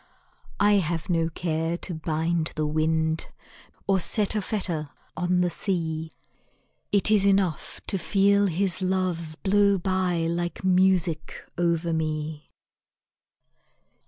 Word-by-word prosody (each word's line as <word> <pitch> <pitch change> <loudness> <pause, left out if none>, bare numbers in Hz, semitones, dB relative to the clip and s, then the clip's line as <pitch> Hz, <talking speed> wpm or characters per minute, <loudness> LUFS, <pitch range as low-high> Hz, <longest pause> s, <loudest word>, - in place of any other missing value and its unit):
I 205 0 +5
have 170 -1 -1
no 165 -1 +1
care 165 0 -2
to 180 - -5
bind 160 +1 -1
the 155 -1 -1
wind 160 +1 0 0.6
Or 195 -1 +2
set 205 +4 +2
a 215 - 0
fetter 175 -7 -2 0.3
on 180 0 +1
the 175 -1 +1
sea 160 -3 -2 0.8
It 205 +1 +3
is 210 -2 +4
enough 195 -6 +1
to 195 - -2
feel 200 +2 +3
his 185 +1 0
love 180 -4 -1
Blow 200 0 +4
by 185 -2 0
like 170 +2 -2
music 185 -4 +1
over 170 -1 0
me. 155 -1 -3
175 Hz, 120 wpm, -25 LUFS, 160-190 Hz, 0.8 s, I